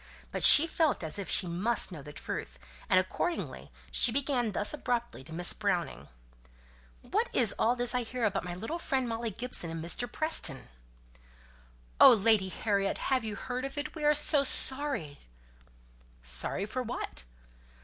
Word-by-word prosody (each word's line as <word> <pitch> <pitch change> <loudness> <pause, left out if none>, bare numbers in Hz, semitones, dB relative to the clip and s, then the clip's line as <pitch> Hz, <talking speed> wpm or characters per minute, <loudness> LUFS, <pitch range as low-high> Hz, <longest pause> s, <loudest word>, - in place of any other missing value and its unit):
But - - -5
she 305 - +12
felt 315 - -1
as 160 +5 -3
if 195 - -6
she 190 - +6
must 190 +7 +1
know 160 -5 -9
the 150 +1 -11
truth, 60 - -6 0.3
and 185 - +4
accordingly 260 - -5 0.2
she 240 - +2
began 255 -3 -2
thus 205 +5 +1
abruptly 240 - -4
to 145 - -15
Miss 175 +2 +1
Browning: 190 -5 -4 1.0
"What - - -2
is - - +2
all 235 +2 +1
this 245 0 0
I 250 - -1
hear 245 +1 -6
about 210 -3 -1
my 175 -1 -7
little 225 - -6
friend 265 -6 -3
Molly 230 0 -4
Gibson 230 -5 -2
and 165 0 -7
Mr. 240 +8 -4
Preston?" 310 - 0 1.3
"Oh, - - +8
Lady 210 -3 +1
Harriet! 200 0 -2 0.2
have 260 - 0
you 215 -2 -6
heard 250 +5 -6
of 275 +1 -7
it? 300 +2 -5
We 310 - -8
are 300 0 +3
so 295 0 +1
sorry!" 265 - 0 1.0
"Sorry 60 - +1
for 255 +5 -5
what?" 235 - -7
225 Hz, 165 wpm, -28 LUFS, 180-260 Hz, 1.3 s, she